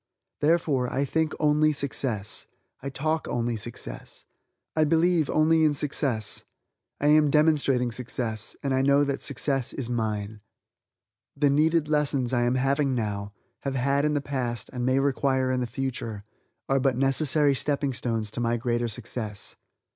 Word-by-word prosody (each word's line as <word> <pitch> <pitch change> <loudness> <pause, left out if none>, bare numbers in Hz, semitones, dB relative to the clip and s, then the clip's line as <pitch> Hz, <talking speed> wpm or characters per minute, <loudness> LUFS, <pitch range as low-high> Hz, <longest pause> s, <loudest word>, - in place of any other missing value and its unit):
Therefore, 145 -5 +1
I 140 +2 0
think 160 +3 0
only 150 0 +3
success; 130 -7 -2 0.3
I 140 - -4
talk 155 +4 -2
only 120 -1 -1
success; 110 - -7 0.5
I 155 - +3
believe 165 0 +2
only 160 +1 +3
in 150 -2 +3
success; 135 -7 -1 0.6
I - - -2
am 150 -1 +5
demonstrating 140 -5 +2
success, 115 -2 -2
and 135 -1 0
I 130 - +2
know 140 +1 +4
that 140 -1 -2
success 135 -1 0
is 125 -3 -4
mine. 105 -2 -3 1.0
The 145 -1 +3
needed 155 +2 +2
lessons 140 -4 +1
I 120 -1 +2
am 120 +1 +1
having 135 +1 +1
now, 100 -3 -3 0.3
have 135 -1 -3
had 140 +2 +1
in 150 0 +1
the 145 - +1
past, 125 -4 -3
and 125 0 -2
may 130 +1 +3
require 135 -1 +1
in 130 - 0
the 125 - -2
future, 115 -4 -4 0.4
are 135 0 +2
but 130 -2 +1
necessary 140 +2 +3
stepping 140 0 -1
stones 115 -4 -2
to - - -6
my 120 0 +1
greater 120 0 -1
success. 110 -2 -5
135 Hz, 155 wpm, -26 LUFS, 120-145 Hz, 1.0 s, am